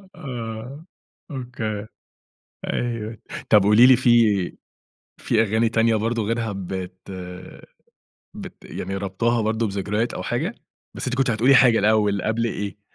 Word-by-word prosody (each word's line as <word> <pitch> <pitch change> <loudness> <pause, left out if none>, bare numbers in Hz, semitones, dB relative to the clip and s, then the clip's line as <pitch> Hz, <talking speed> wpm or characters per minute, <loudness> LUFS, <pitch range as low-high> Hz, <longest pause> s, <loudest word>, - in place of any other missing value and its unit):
آه 125 +3 -7 0.5
أوكي، 115 -5 -5 0.9
أيوه 115 -2 -3 0.3
طَب 105 -2 +6
قولي 105 +4 +6
لي 130 - +8
في 115 -7 +3 0.6
في 115 -1 +2
أغاني 110 +2 +1
تانية 115 0 +2
برضه 115 +2 -1
غيرها 115 0 -2
بت 95 -1 -7 1.2
بت - - -10
يعني 95 +1 -5
رابطاها 110 +4 0
برضه 110 +1 0
بذكريات 105 +3 -2
أو - - -5
حاجة؟ - - -2 0.4
بس - - -5
أنتِ 125 - -1
كنتِ 135 -1 +2
هتقولي 120 +5 +4
حاجة 125 -3 +6
الأول 105 -2 +2
قبل 115 +1 0
إيه؟ 105 -2 -5
110 Hz, 130 wpm, -23 LUFS, 105-120 Hz, 1.2 s, لي